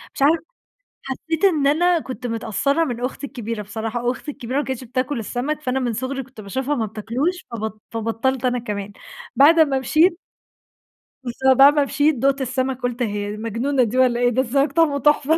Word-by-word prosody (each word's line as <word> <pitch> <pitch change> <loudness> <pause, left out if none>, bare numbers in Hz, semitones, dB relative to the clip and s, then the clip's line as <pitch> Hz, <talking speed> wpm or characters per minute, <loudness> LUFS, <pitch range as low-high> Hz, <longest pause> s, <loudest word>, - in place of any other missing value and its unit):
مش - - -7
عارفة 320 +4 +4 0.6
حسّيت 320 +6 -3
إن 315 -8 +3
أنا 345 +4 +3
كنت 255 -4 -6
متأثّرة 240 +7 0
من 245 -5 -4
أختي 275 +2 -4
الكبيرة 230 -4 -5
بصراحة، 225 +3 -3
أختي 255 +4 -5
الكبيرة 255 -1 -4
ما 290 - 0
كانتش 260 -1 -4
بتاكل 255 +2 -2
السمك، 255 +7 -3
فأنا 265 -2 -1
من 245 -2 -1
صُغري 260 +4 -3
كنت 260 -3 -13
باشوفها 265 +8 -2
ما 225 -5 -1
بتاكلوش 240 - -3
فبط 220 -2 -5
فبطّلت 230 +3 -1
أنا 250 -1 +1
كمان، 205 -3 -5 0.4
بعد 305 +5 +6
أمّا 280 -4 +4
مشيت 325 +7 +3 1.1
بالض 260 +1 +2
بعد 280 +2 +8
ما 295 - +3
مشيت 290 +2 +2
دُقت 275 +3 +1
السمك 260 0 -2
قُلت 245 0 -3
هي 205 -2 -3
دي 210 - -6
مجنونة 235 +5 0
دي 235 +2 -2
والّا 250 -2 +3
إيه 245 0 +3
ده 245 +2 +1
السمك 275 +3 +1
طعمة 290 -2 +2
تحفة 295 +2 +3
260 Hz, 185 wpm, -21 LUFS, 230-285 Hz, 1.1 s, بعد